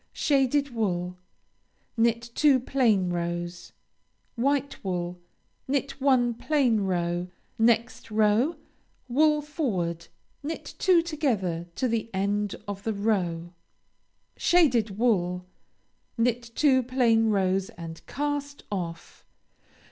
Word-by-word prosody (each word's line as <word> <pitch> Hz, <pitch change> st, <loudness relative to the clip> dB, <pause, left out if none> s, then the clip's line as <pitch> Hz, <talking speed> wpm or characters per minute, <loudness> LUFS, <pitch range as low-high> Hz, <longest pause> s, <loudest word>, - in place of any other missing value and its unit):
Shaded 280 Hz, -1 st, +2 dB
wool 180 Hz, -5 st, -2 dB, 0.8 s
Knit 235 Hz, 0 st, +1 dB
two 285 Hz, -2 st, +4 dB
plain 225 Hz, -8 st, +2 dB
rows. 175 Hz, 0 st, -4 dB, 0.6 s
White 280 Hz, +3 st, 0 dB
wool 180 Hz, -2 st, -3 dB, 0.5 s
Knit 275 Hz, 0 st, -2 dB
one 255 Hz, -3 st, +3 dB
plain 250 Hz, -3 st, +1 dB
row. 175 Hz, -2 st, -1 dB, 0.3 s
Next 230 Hz, +1 st, +2 dB
row; 220 Hz, +8 st, +2 dB, 0.5 s
wool 300 Hz, +4 st, +3 dB
forward, 185 Hz, -, -2 dB, 0.3 s
knit 310 Hz, +3 st, -6 dB
two 360 Hz, -3 st, +4 dB
together 215 Hz, -, -1 dB
to 255 Hz, -, 0 dB
the 230 Hz, -1 st, -1 dB
end 200 Hz, +1 st, 0 dB
of 200 Hz, -1 st, -5 dB
the 220 Hz, +2 st, -2 dB
row. 180 Hz, -5 st, -1 dB, 0.8 s
Shaded 245 Hz, -, +3 dB
wool 180 Hz, -6 st, +1 dB, 0.7 s
Knit 235 Hz, 0 st, 0 dB
two 270 Hz, -4 st, +4 dB
plain 235 Hz, -3 st, +2 dB
rows 190 Hz, -2 st, +1 dB
and 165 Hz, -1 st, -9 dB
cast 285 Hz, 0 st, -3 dB
off. 170 Hz, -4 st, -5 dB
225 Hz, 100 wpm, -27 LUFS, 180-270 Hz, 0.8 s, two